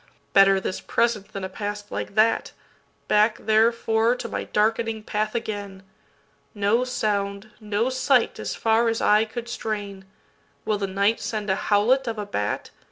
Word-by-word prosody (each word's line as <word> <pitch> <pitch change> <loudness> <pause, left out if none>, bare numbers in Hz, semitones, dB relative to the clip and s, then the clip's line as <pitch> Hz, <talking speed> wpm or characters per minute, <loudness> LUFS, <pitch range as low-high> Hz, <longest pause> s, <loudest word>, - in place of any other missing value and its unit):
Better 195 0 +6
this 190 - -4
present 230 -4 0
than 195 - -7
a - - -2
past 205 +2 -6
like - - -5
that; 220 +1 +2 0.5
Back 215 +1 +3
therefore 225 +1 +2
to 245 - -6
my - - -4
darkening 220 +1 0
path 215 +1 -2
again! 205 -4 -5 0.7
No 205 +4 +2
sound, 205 -4 -2
no 215 +1 -1
sight 260 -1 +2
as - - -4
far 225 +1 +2
as 225 - -1
eye 210 +1 +4
could 235 +2 -7
strain. 205 -4 -5 0.6
Will 215 -2 0
the 200 - -1
night 200 +4 +1
send 210 -3 -2
a - - +2
howlet 240 +6 +3
of 225 -1 -3
a 210 - -3
bat? 105 - -3
215 Hz, 160 wpm, -24 LUFS, 205-230 Hz, 0.7 s, Better